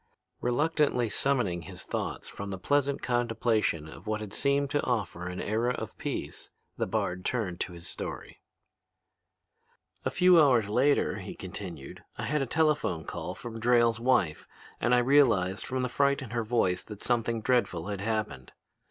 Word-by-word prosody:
Reluctantly 125 -2 +1
summoning 120 -11 +1
his - - -8
thoughts - - -4
from 100 0 -6
the 95 - -4
pleasant 140 +6 +1
contemplation 115 - +1
of 80 - -12
what 110 0 -1
had 105 -2 -7
seemed 140 0 +1
to 145 - +2
offer 100 -7 -2
a 90 - -5
new - - -4
era 115 +4 0
of - - -6
peace, - - -4 0.3
the - - -1
bard 90 +1 -1
turned 95 -8 -2
to 90 - -3
his 85 0 -10
story. - - -6 1.6
"A - - 0
few 180 -2 +6
hours 120 -8 +4
later," 135 +6 +2
he - - -7
continued, 90 -6 -8
"I - - -4
had 150 0 0
a 135 - -1
telephone 150 - +1
call - - -5
from 115 -1 -7
Drayle's 120 -1 +3
wife, 115 -11 +1 0.3
and 120 +1 +3
I 120 0 +3
realized 115 -9 +3
from 130 0 -1
the - - +1
fright 140 +2 +1
in 120 - -9
her 115 -1 -1
voice 105 -6 +1
that 105 -2 -9
something 115 -1 +1
dreadful 105 -7 0
had 100 -2 -3
happened. 105 - -3
115 Hz, 170 wpm, -29 LUFS, 95-130 Hz, 1.6 s, few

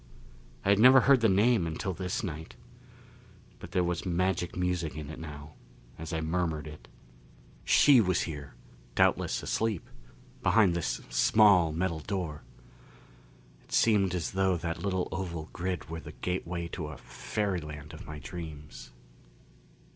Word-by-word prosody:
I - - +2
had 100 0 +5
never 130 +3 +8
heard 135 0 +5
the 115 - +4
name 105 -1 +3
until 85 +4 -3
this 90 +4 -3
night. 80 -4 -6 1.0
But - - -10
there 90 - +1
was 85 0 -2
magic 90 -1 -1
music 90 -4 -1
in 75 -1 -6
it - - -9
now, 75 -2 -9 0.5
as 80 0 -6
I 80 - -2
murmured 80 -2 -1
it. 75 0 -11 0.8
She 140 -5 +6
was 95 -3 +1
here, 70 -5 -6 0.4
doubtless - - +2
asleep, 110 -6 -1 0.5
behind 95 -1 +4
this 85 -1 -2
small 90 - +5
metal 85 0 -1
door. 85 -3 -4 1.2
It - - -24
seemed 100 -5 +3
as 85 - -2
though 95 -1 +1
that 85 0 -4
little 95 -2 -1
oval 85 -4 -5
grid 90 0 -3
were 80 0 -6
the - - -10
gateway 90 -1 -3
to 80 -3 -5
a 75 - -8
fairyland 75 -8 -4
of - - -10
my 75 - -7
dreams. 75 +1 -9
90 Hz, 145 wpm, -29 LUFS, 80-95 Hz, 1.2 s, never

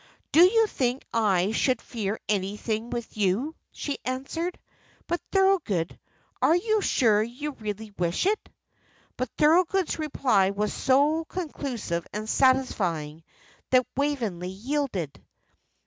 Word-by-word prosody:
"Do 330 - +7
you 445 +5 +5
think 255 - -1
I 200 -4 +2
should 255 +3 +1
fear 215 -3 -4
anything 210 +3 -1
with 235 -1 -5
you?" 215 +10 +1 0.2
she 285 - -4
answered. 275 +8 -3 0.5
"But, 345 0 -2
Thorold, 360 - +2 0.5
are 325 - +5
you 435 +4 +1
sure 220 - +3
you 250 +7 -4
really 215 -3 -6
wish 175 - 0
it?" 415 +2 0 0.7
But 255 -1 -3
Thorold's 345 +3 +3
reply 260 -10 +2
was 205 +1 -1
so 290 +5 +2
conclusive 270 - -4
and 215 +1 -4
satisfying 185 - +1 0.5
that 255 -1 +4
Waveney 235 -11 -1
yielded. 205 - -3
250 Hz, 115 wpm, -26 LUFS, 205-300 Hz, 0.7 s, Do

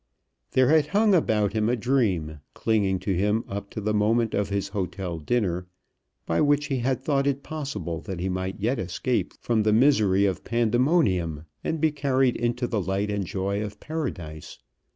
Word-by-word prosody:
There 130 0 +4
had 155 -1 +4
hung 205 +5 +3
about 105 - +2
him 110 0 +1
a 125 - +2
dream, 105 - 0 0.2
clinging 100 -4 +1
to 100 - -1
him 105 +5 +1
up 100 +1 -5
to - - -6
the 105 0 -1
moment 110 +2 +2
of 100 0 0
his 100 -1 -2
hotel 95 -3 -4
dinner, 90 -1 -1 0.6
by 80 - +1
which 145 0 +3
he 135 -2 0
had 130 +1 -1
thought 140 -1 +1
it 140 0 -1
possible 105 - -4
that 95 -3 -6
he 90 - -2
might 95 +2 -3
yet 115 +6 0
escape 95 +8 -1
from 115 -2 +1
the 105 0 +2
misery 110 -6 +4
of 95 -2 -1
Pandemonium 115 - +1 0.2
and 160 - -2
be 160 0 +3
carried 135 -3 +1
into 120 +1 -1
the 110 -3 -1
light 95 +3 -1
and 100 -3 -2
joy 100 +2 -2
of 105 -1 -7
Paradise. 95 - -5
110 Hz, 180 wpm, -25 LUFS, 95-130 Hz, 0.6 s, There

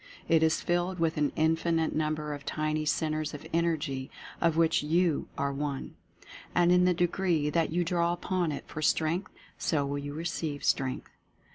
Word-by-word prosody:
It 165 -1 +4
is 160 0 +3
filled 175 +1 0
with 165 -1 0
an 150 -1 +2
infinite 165 +1 +1
number 155 -1 -1
of 145 -1 -7
tiny 155 +1 -1
Centres 155 -1 -1
of 145 - -10
Energy, 155 -5 0 0.3
of 165 -2 +2
which 165 -1 +3
YOU 165 +1 +1
are 140 0 0
one. 140 -1 -3 0.6
And 175 0 +4
in 180 0 +5
the 180 - +4
degree 175 -3 +1
that 165 -1 +1
you 175 +2 +1
draw 170 0 +1
upon 175 -1 -1
it 140 - -5
for 155 - -6
Strength, 160 +5 +1 0.3
so 145 -4 +1
will 140 +1 -2
you 145 0 -6
receive 160 -3 -3
Strength. 130 -2 0
160 Hz, 170 wpm, -29 LUFS, 150-170 Hz, 0.6 s, in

